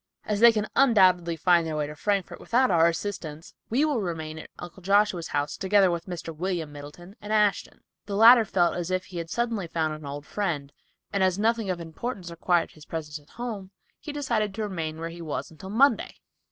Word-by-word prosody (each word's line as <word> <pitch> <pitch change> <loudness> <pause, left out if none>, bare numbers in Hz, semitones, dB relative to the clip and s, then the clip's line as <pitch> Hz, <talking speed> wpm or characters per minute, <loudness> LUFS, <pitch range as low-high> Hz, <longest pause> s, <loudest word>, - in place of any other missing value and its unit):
As 210 -1 -1
they 235 +1 +8
can 215 -2 -1
undoubtedly 185 -10 +4
find 170 +1 +3
their 155 - -3
way 150 - 0
to 150 - -7
Frankfort 200 +3 -1
without 255 +1 +2
our 165 -1 +5
assistance, 170 -3 -4 0.2
we 265 +7 +2
will 290 -7 0
remain 160 -4 -4
at - - -10
Uncle 175 +2 -10
Joshua's 195 -2 +2 0.3
together 195 -1 +4
with 170 +1 -4
Mr. 165 -2 -6
William 170 -2 -3
Middleton 150 +6 -11
and 210 - -7
Ashton. 210 -2 +1 0.3
The 200 - -3
latter 230 +3 +8
felt 180 -4 +1
as 175 0 -3
if 185 0 -1
he 180 -2 -7
had 165 -1 -6
suddenly 230 -5 -1
found 160 -1 -1
an 155 0 -9
old 145 +1 -6
friend, 155 -9 -3 0.4
and 200 - 0
as 185 -1 +2
nothing 225 -1 +1
of 180 -2 -2
importance 175 +3 -6
required 170 +1 +1
his 155 -1 -16
presence 155 -2 -5
at 145 - -23
home, 220 -6 -5 0.3
he 300 - -7
decided 235 -9 -1
to 220 - -3
remain 165 -6 -4
where 165 0 -4
he 170 +1 -9
was 155 -1 -4
until 160 +4 -10
Monday. 265 +7 +2
185 Hz, 205 wpm, -26 LUFS, 165-210 Hz, 0.4 s, they